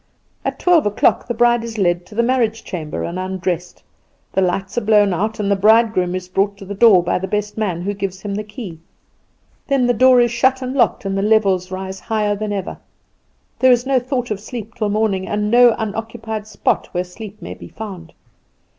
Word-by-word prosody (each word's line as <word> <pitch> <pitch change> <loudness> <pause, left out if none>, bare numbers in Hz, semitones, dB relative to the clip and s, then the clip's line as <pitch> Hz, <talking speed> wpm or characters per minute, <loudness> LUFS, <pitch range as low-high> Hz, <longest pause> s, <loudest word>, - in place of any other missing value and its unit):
At - - -3
twelve 345 - +3
o'clock 205 - +2
the 240 - -1
bride 240 0 +3
is 230 -1 -6
led 175 -2 0
to 210 - -13
the 235 - +2
marriage 235 -3 0
chamber 160 -5 -5
and 175 +2 -4
undressed; 185 -2 -4 0.5
the 190 - +2
lights 190 +1 -1
are 240 - +1
blown 210 -2 +4
out, 215 +5 -2
and 205 -1 0
the - - +4
bridegroom 210 -3 +3
is 185 -1 -5
brought 195 +2 0
to 195 - -10
the 200 - -5
door 200 -4 +6
by 175 +1 0
the 190 - -4
best 210 +1 -2
man, 185 -6 -2
who 200 +2 -2
gives 195 -1 -5
him 205 -1 -3
the 210 +1 -3
key; 205 -6 -9 0.9
then 275 -3 +2
the 245 - +3
door 255 +2 +5
is 240 -1 +3
shut 260 +2 +2
and 255 0 -3
locked, 240 -6 +1
and 195 0 -1
the 195 - 0
revels 195 -4 +2
rise 190 0 -6
higher 210 -2 -1
than 210 0 -4
ever. 195 -2 -4 0.8
There 260 0 +5
is 245 0 +3
no 265 -1 +2
thought 250 -1 -3
of 205 - -2
sleep 225 0 -8
till 220 -4 -2
morning, 205 -3 0
and 210 0 -1
no 240 -1 +6
unoccupied 220 0 -5
spot - - -1
where 180 0 0
sleep 205 +3 -10
may - - -7
be - - -11
found. 185 -7 -9
210 Hz, 210 wpm, -19 LUFS, 190-230 Hz, 0.9 s, door